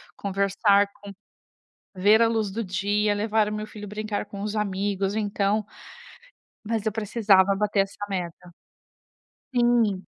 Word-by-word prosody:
Conversar 200 +1 +2
com 200 0 -9 0.8
ver 205 +4 +4
a 230 - +4
luz 220 -3 -1
do 225 +4 -3
dia, 205 +2 0
levar 210 +1 +1
o - - -4
meu 215 0 -4
filho, 210 -1 -9
brincar 210 0 -4
com 200 -1 -8
os 210 +1 -3
amigos". 200 -1 -1
Então 210 0 0 1.0
mas 225 0 -2
eu 220 - +1
precisava 205 -2 +3
bater 205 0 +1
essa 195 +1 -5
meta. 180 -2 -5 1.1
Sim. 240 -5 +2
205 Hz, 135 wpm, -25 LUFS, 195-215 Hz, 1.1 s, ver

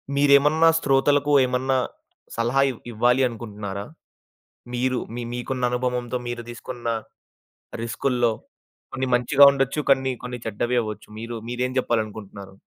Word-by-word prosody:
మీరేమన్నా 145 +3 +5
శ్రోతలకు 145 +1 +2
ఏమన్నా 130 +1 0 0.6
సలహా 120 +4 +1
ఇవ్ 125 - -6
ఇవ్వాలి 120 +3 +2
అనుకుంటున్నారా? 105 -4 -6 0.9
మీరు 130 +1 0 0.2
మీ 120 - -4
మీకున్న 125 +1 -4
అనుభవంతో 125 0 -2
మీరు 120 -1 -4
తీసుకున్న 120 0 -8 1.0
రిస్క్‌ల్లో, 120 0 0 0.6
కొన్ని 130 0 -2
మంచిగా 135 +4 +6
ఉండొచ్చు, 135 +2 0
కొన్ని 130 -1 +2
కొన్ని 125 0 -5
చెడ్డవి 120 +3 -1
అవ్వొచ్చు. 110 -1 -7
మీరు 115 +1 -5
మీరెం 125 +1 -2
చెప్పాలనుకుంటున్నారు? 105 -4 -4
125 Hz, 115 wpm, -24 LUFS, 115-135 Hz, 1.0 s, మంచిగా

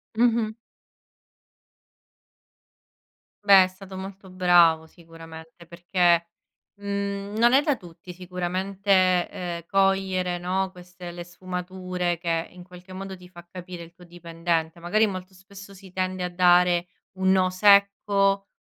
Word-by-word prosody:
Mh-mh. 230 -1 +1 2.9
Beh, 195 -2 +8
è - - -1
stato 190 +1 -12
molto 190 0 -9
bravo, 175 -3 +4
sicuramente, 165 0 -14
perché, 175 0 +1 0.5
mhmm, 200 0 -4
non 240 +2 +4
è 275 - +6
da 290 -2 0
tutti 180 0 -13
sicuramente, 185 +2 -4 0.4
ehm, 175 -2 -6
cogliere, 195 -2 +1
no, 185 +2 -2
queste 180 -1 -11
le 175 0 -8
sfumature 180 0 -4
che 165 -1 -2
in 180 0 -13
qualche 180 0 -15
modo 190 0 -7
ti 180 -1 -16
fa 175 -1 -14
capire 180 -1 -9
il 170 0 -15
tuo 180 - -18
dipendente. 170 -1 -3
Magari 210 +6 +1
molto 185 -1 -7
spesso 200 +1 -14
si 190 -1 -15
tende 185 0 -2
a 180 - -2
dare 175 0 +3 0.3
un 190 0 +3
no 185 -1 +3
secco 200 0 +3
185 Hz, 130 wpm, -24 LUFS, 175-195 Hz, 2.9 s, Beh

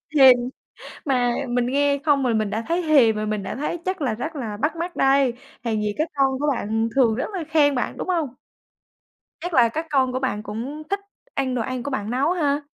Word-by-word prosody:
Thèm. 265 -3 +9 0.7
Mà 245 -4 +2
mình 240 0 +1
nghe 280 +2 +2
không 290 -3 +3
rồi 240 -2 +1
mình 215 -2 0
đã 220 +2 -2
thấy 340 +2 +1
thèm 275 -9 +5
rồi, 215 0 -2
mình 210 -1 -2
đã 195 - -4
thấy 300 +5 -2
chắc 375 -1 -2
là 255 -7 0
rất 305 +8 -5
là 225 -7 -4
bắt 300 +9 -1
mắt 345 +2 -4
đây, 270 -2 +4 0.3
hèn 220 -2 0
gì 210 -1 0
các 310 +2 0
con 270 -1 +2
của 295 - -1
bạn 225 0 -1
thường 245 -5 +4
rất 245 - -2
là 355 -4 -3
khen 290 -2 +4
bạn, 245 - -2
đúng - - -4
không? 335 -5 +1 1.1
Chắc 350 +2 -5
là 240 -5 +5
các 320 +8 -3
con 265 -3 +2
của 255 - -1
bạn 255 -6 -2
cũng 240 +9 -5
thích 400 - 0 0.3
ăn 260 -2 -1
đồ 240 - 0
ăn 255 +1 -3
của 285 - -4
bạn 215 -5 -3
nấu 265 +6 +1
ha? 295 -5 +1
265 Hz, 230 wpm, -23 LUFS, 230-300 Hz, 1.1 s, Thèm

